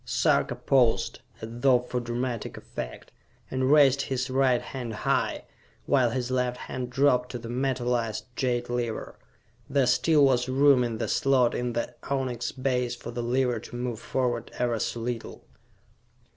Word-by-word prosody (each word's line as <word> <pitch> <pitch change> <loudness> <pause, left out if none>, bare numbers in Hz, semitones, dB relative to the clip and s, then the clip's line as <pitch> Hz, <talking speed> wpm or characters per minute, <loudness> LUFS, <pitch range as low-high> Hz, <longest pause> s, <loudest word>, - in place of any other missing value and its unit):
Sarka - - +1
paused, 125 -4 +2 0.2
as 110 - -6
though 130 -2 +6
for 125 0 -3
dramatic 120 -1 -3
effect, - - -8 0.4
and 130 +1 +1
raised 140 -2 +6
his 130 -1 -2
right 130 -2 +3
hand 125 -3 -6
high, - - 0 0.4
while 130 -4 +3
his 125 +1 -3
left 125 -1 0
hand 125 -1 -5
dropped 125 -1 +2
to - - -2
the 115 -1 -8
metalized 120 -3 -1
jade 120 -2 0
lever. 120 -2 -3 0.5
There 135 -1 +3
still 145 +4 +4
was 130 -1 +2
room 135 -1 +5
in 115 -2 -2
the - - -2
slot 130 -3 +3
in 120 -1 -2
the 120 - -2 0.2
onyx 125 -4 -1
base 125 -2 -1
for 120 - -8
the 120 0 -4
lever 125 0 +1
to 120 - -10
move 120 -2 -3
forward 120 -2 -2
ever 120 -2 0
so 115 - -2
little. 120 -1 -5
125 Hz, 160 wpm, -27 LUFS, 120-130 Hz, 0.5 s, though